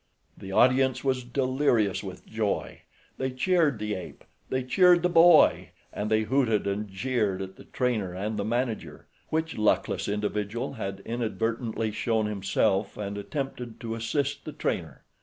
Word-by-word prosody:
The 95 - -9
audience 130 +4 +3
was 130 -2 0
delirious 130 -4 +1
with - - -8
joy. - - -2 0.4
They 130 - 0
cheered 145 +1 +2
the 105 0 -3
ape. 90 - -8 0.3
They 130 0 -1
cheered 175 +6 +5
the 180 - +3
boy, 170 0 +6 0.2
and 105 +1 -3
they 110 0 +3
hooted 115 -4 +1
and 100 +2 -2
jeered 105 -1 -1
at 95 0 -6
the - - -14
trainer 115 -7 -1
and 100 +4 -3
the 100 - -2
manager, 120 +1 -3 0.2
which 160 -4 -2
luckless 105 - +1
individual 105 +3 -2
had 100 -5 -5
inadvertently 115 0 -2
shown 110 0 0
himself 100 -1 0
and 100 -1 -4
attempted 125 +1 -5
to 115 -2 -4
assist 140 +5 -2
the 155 - -7
trainer. 85 - -3
115 Hz, 150 wpm, -27 LUFS, 105-130 Hz, 0.4 s, boy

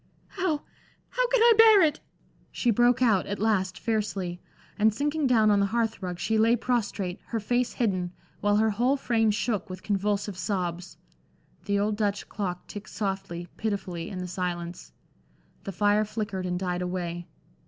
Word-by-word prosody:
"How 360 -6 -1 0.5
how - - +1
can - - +2
I 470 0 +8
bear 440 -4 +8
it?" 310 -1 +2 0.5
she 240 - +1
broke 240 +3 +3
out, 210 -7 +3
at 200 - -3
last, 190 -3 0
fiercely, 200 -6 -2 0.4
and 220 +1 +5
sinking 295 +5 0
down 220 -4 +4
on 205 - +4
the 200 - +2
hearth 225 0 -1
rug, 180 -2 -4
she 220 +5 0
lay 230 +2 +5
prostrate, 215 -6 -2
her 230 - -2
face 245 +3 0
hidden, 185 -7 -1 0.3
while 205 0 +2
her 220 +1 +3
whole 245 +7 +2
frame 225 -4 +1
shook 215 0 -1
with 185 0 -8
convulsive 205 -1 -1
sobs. 180 -1 -3 0.7
The 200 -1 +1
old 205 +1 0
Dutch 205 -2 -1
clock 180 -4 -4
ticked 205 0 -9
softly, 195 -4 -4
pitifully, 190 -6 -3
in 190 - -6
the 180 0 -4
silence; 175 -1 -4 0.7
the 195 - -3
fire 205 +3 +2
flickered 205 -3 -4
and 180 0 -1
died 180 -1 -2
away. 175 -1 -4
205 Hz, 165 wpm, -27 LUFS, 185-230 Hz, 0.7 s, I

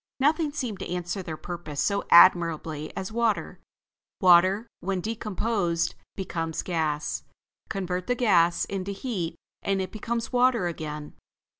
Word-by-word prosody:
Nothing 300 +2 +2
seemed 245 -9 -4
to - - -5
answer 180 +2 -3
their 160 -4 -6
purpose 170 -5 -6
so 200 -1 +1
admirably 165 -3 +5
as 190 +2 -4
water. 230 -2 0 0.6
Water, 185 +4 +5
when 190 +1 -2
decomposed, 205 -5 -1 0.2
becomes 165 -4 -3
gas. 155 -4 -1 0.5
Convert 180 -2 -3
the 245 - +1
gas 175 -8 +3
into 195 0 -4
heat 195 -6 -3 0.3
and 195 -1 0
it 190 - -3
becomes 230 +2 -3
water 245 -5 +3
again. 150 -3 -5
185 Hz, 130 wpm, -26 LUFS, 170-215 Hz, 0.6 s, admirably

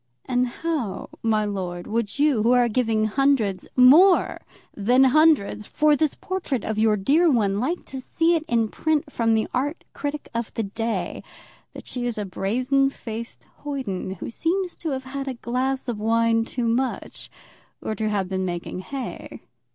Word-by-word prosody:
And 250 0 +1
how, 245 - -3
my 215 -2 +1
lord, 180 -4 -4
would 225 0 -2
you, 285 -6 +3
who 235 +3 +4
are 245 -1 +4
giving 225 -2 +1
hundreds, 220 -5 +1
more 310 +10 +6 0.4
than 245 +6 +4
hundreds, 265 -7 +3
for 300 -1 +3
this 310 0 0
portrait 350 - -3
of 220 -1 -2
your 215 -1 +3
dear 300 - +3
one, 205 -7 +2
like 320 +10 -2
to 265 -1 -7
see 330 +6 +1
it 330 - +1
in 230 -4 +1
print 305 +1 -1
from 225 -1 +2
the 220 - 0
art 285 +6 -2
critic 290 0 -4
of 230 -1 -3
the 225 - -1
day, 225 +3 -3 0.5
that - - -10
she 245 -1 -3
is 235 - -3
a 210 - -2
brazen 255 +9 +1
faced 230 -3 -8
hoyden 255 -10 -4
who 190 - -7
seems 355 +7 -1
to 325 - -4
have 265 -2 -3
had 275 +1 -5
a 260 - -3
glass 255 +3 -2
of 235 -4 -3
wine 225 +1 +2
too 240 0 -2
much, 250 +3 -2 0.5
or - - -3
to 215 +1 -2
have 200 -3 -1
been 190 0 -2
making 175 0 -4
hay? 265 +7 -7
240 Hz, 175 wpm, -24 LUFS, 215-275 Hz, 0.5 s, more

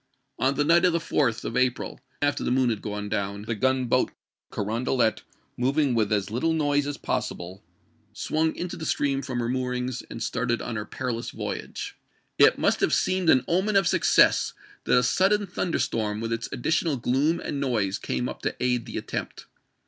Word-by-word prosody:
On 130 +3 +2
the 145 - +2
night 170 +4 +4
of 180 -2 +4
the - - +3
4th 135 -8 0
of - - -4
April, 130 0 0 0.2
after 145 0 +1
the - - 0
moon 125 -1 +3
had 110 - -3
gone 105 -1 -4
down, 100 -1 -2
the 110 +2 -2
gunboat 130 +2 +1 0.4
Carondelet, 115 +2 0 0.4
moving 135 +2 +2
with 110 -3 +1
as 105 -1 0
little 145 +9 +1
noise 145 -2 +1
as 145 0 -3
possible, 90 +2 -3 0.5
swung 160 +1 -1
into 180 0 -4
the 160 - -5
stream 140 -1 +1
from 130 -2 -4
her 120 -1 -1
moorings 125 0 -2
and 115 - -5
started 120 -1 -1
on 115 - -4
her 105 -1 -3
perilous 120 -2 -4
voyage. - - -5 0.4
It - - +7
must - - +2
have - - +2
seemed 185 -2 +1
an 130 -3 +5
omen 190 +5 +1
of 195 -3 +4
success - - +4 0.3
that - - +4
a 125 - +4
sudden 195 +10 +3
thunder 180 -2 -2
storm 105 -2 -1
with 115 0 -2
its 115 0 -3
additional 155 +2 0
gloom 135 +7 +1
and 140 - -4
noise 110 -8 0
came 65 -1 -2
up - - -7
to - - -2
aid 125 -2 0
the - - -5
attempt. - - -5
125 Hz, 185 wpm, -26 LUFS, 115-145 Hz, 0.5 s, It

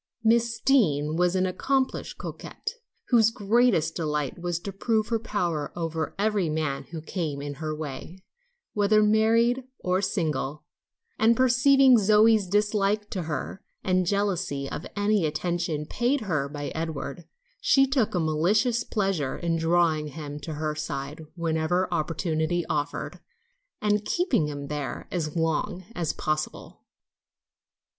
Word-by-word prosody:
Miss 230 0 +2
Deane 155 - +2
was 180 +1 +2
an 185 0 +2
accomplished 265 +8 -1
coquette, 430 - -6 0.4
whose 225 -3 +5
greatest 225 -5 +2
delight 150 -2 -2
was 175 -1 -1
to 200 - -5
prove 220 +2 0
her 230 -1 +1
power 175 -9 -2
over 165 -2 -3
every 205 -4 +1
man 155 -3 -2
who 160 -2 -8
came 160 -5 -3
in 145 0 -5
her 155 -1 -2
way, 150 +3 -7 0.6
whether 210 +1 +4
married 230 +4 +3
or 185 +1 0
single, 155 -7 -2 0.6
and 225 +1 +4
perceiving 260 0 +6
Zoe's 215 0 +5
dislike 210 +1 +1
to 190 - -2
her, 160 +4 -4 0.2
and 185 -1 +1
jealousy 190 -8 0
of 150 - -6
any 205 -1 +2
attention 165 -1 -1
paid 245 - 0
her 155 -9 -1
by 145 0 -5
Edward, 160 0 -5 0.3
she 270 -1 +4
took 260 -7 0
a - - +2
malicious 205 +10 +2
pleasure 195 - -1
in 170 -1 -1
drawing 165 -2 +2
him 150 0 -7
to 155 +1 -6
her 155 0 -2
side 150 0 -5
whenever 170 +2 0
opportunity 165 +1 -1
offered, 145 -1 -3 0.6
and 210 0 +1
keeping 270 - +1
him 145 -1 -5
there 140 -4 -5
as 160 -3 -2
long 170 +3 -1
as 170 -6 -1
possible. 155 0 -3
175 Hz, 135 wpm, -26 LUFS, 155-215 Hz, 0.6 s, perceiving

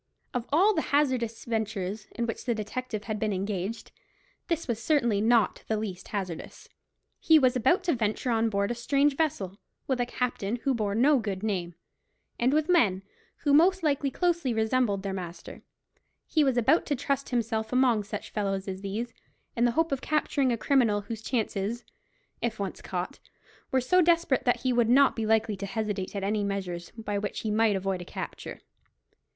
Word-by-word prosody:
Of 245 -2 -2
all 380 +9 +5
the 320 - +1
hazardous 255 -7 0
ventures 215 -3 -3
in 235 - -1
which 230 - -5
the 235 -1 +1
detective 215 0 -4
had 215 -2 -3
been 215 0 0
engaged, 195 +2 -3 0.6
this 335 -1 -1
was 230 -2 -2
certainly 235 -6 +2
not 225 -2 +3
the 220 - 0
least 195 -4 -5
hazardous. 185 -6 -5 0.5
He 320 - +6
was 255 -4 +3
about 350 - +3
to 355 - +2
venture 225 +1 -1
on 225 0 +2
board 200 +1 0
a - - +1
strange 275 +4 +2
vessel, 210 - -1 0.3
with 260 -2 0
a 240 - 0
captain 240 -4 -2
who 275 - +2
bore 210 -4 -1
no 270 +4 +4
good 200 -3 -4
name, 180 -5 -2 0.6
and 245 +2 +3
with 305 +1 +2
men 210 - +3 0.4
who 290 -3 +3
most 360 +4 +5
likely 285 -2 +1
closely 340 -5 0
resembled 220 -3 +1
their 195 -1 -3
master; 175 -2 -7 0.6
he 310 - +2
was 265 -3 +2
about 270 +8 +3
to 290 - +1
trust 275 +1 -2
himself 225 -2 -1
among 250 -4 +3
such 205 0 -6
fellows 195 -2 -2
as 190 0 -5
these, 220 +4 -4 0.4
in 235 - +2
the 240 - +3
hope 325 +2 +1
of 270 -2 -1
capturing 285 -3 +1
a 235 - 0
criminal 225 -5 +2
whose 215 +2 -6
chances, 225 -1 -2 0.6
if 230 -2 -1
once 195 -2 -4
caught, 180 0 -4 0.5
were 265 - +2
so 360 +9 +3
desperate 335 -6 +2
that 245 - +2
he 255 -1 +1
would 240 -2 +3
not 275 +3 +5
be 225 -2 -2
likely 220 -1 +2
to 200 +1 -5
hesitate 205 -2 -3
at 200 - -3
any 205 +1 0
measures 185 -4 -3
by 205 -2 -2
which 205 -1 -4
he 215 - -2
might 215 -1 +3
avoid 190 -1 -2
a - - -5
capture. - - -7
225 Hz, 185 wpm, -28 LUFS, 205-265 Hz, 0.6 s, He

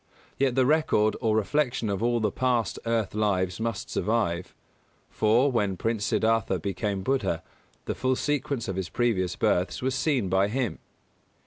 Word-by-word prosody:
Yet 135 -2 +2
the 130 -1 +4
record 135 -8 +2
or 110 -3 +2
reflection 125 +2 0
of 100 -1 -2
all 120 0 +2
the 105 -2 0
past 125 -1 0
earth 115 -3 0
lives 95 -4 0
must 115 -2 -3
survive; 100 -6 -1 0.6
for, 120 +6 +3
when 100 -6 0
Prince 110 0 -1
Siddhārtha 110 -4 +1
became 95 +2 -2
Buddha, 110 -9 0 0.4
the - - -2
full 130 0 0
sequence 140 -3 -1
of 95 - -3
his 95 -3 -3
previous 100 -7 0
births 90 +1 +1
was 130 0 0
seen 130 -6 +1
by 95 +2 +2
him. 115 -5 -2
110 Hz, 155 wpm, -27 LUFS, 95-125 Hz, 0.6 s, the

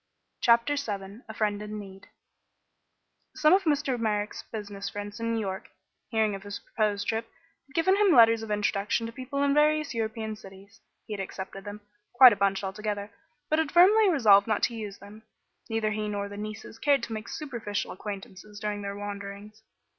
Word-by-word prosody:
CHAPTER 235 +5 +3
VII 205 -4 -5
A - - -6
FRIEND 210 -2 0
IN 210 0 -6
NEED 195 -1 -10 1.3
Some 305 +3 +5
of 385 0 +3
Mr. 290 -5 +1
Merrick's 210 -2 -1
business 205 -2 -5
friends 205 +1 -7
in 230 0 -1
New - - 0
York, 190 -2 -4 0.4
hearing 220 -3 +1
of 195 - -6
his 205 +1 -6
proposed 205 -2 -2
trip, 225 +1 -2 0.4
had 265 - -22
given 375 +3 +4
him 405 -1 +4
letters 230 -5 +6
of 225 - -7
introduction 210 +2 0
to 230 - -5
people 265 +3 -3
in 280 0 +3
various 300 0 +3
European 220 -1 -3
cities. 200 +1 -15 0.2
He 215 - -6
had 205 - -5
accepted 195 +1 -6
them 205 +1 -7 0.3
quite 250 -1 +9
a - - -2
bunch, 200 0 +1
altogether 205 +1 -4 0.4
but 310 - +2
had 315 -2 0
firmly 400 +4 +6
resolved 215 - +5
not 215 -2 0
to 240 - +2
use 210 -3 -6
them. 205 +2 -13 0.5
Neither 225 -1 0
he 215 0 -2
nor 200 -1 -3
the 200 - -9
nieces 215 +1 -7
cared 285 +1 +3
to 225 - -4
make 215 +1 -6
superficial 235 -9 -4
acquaintances 205 +1 -8
during 210 -1 -3
their 200 0 -5
wanderings. 205 +1 -7
215 Hz, 185 wpm, -28 LUFS, 205-235 Hz, 1.3 s, quite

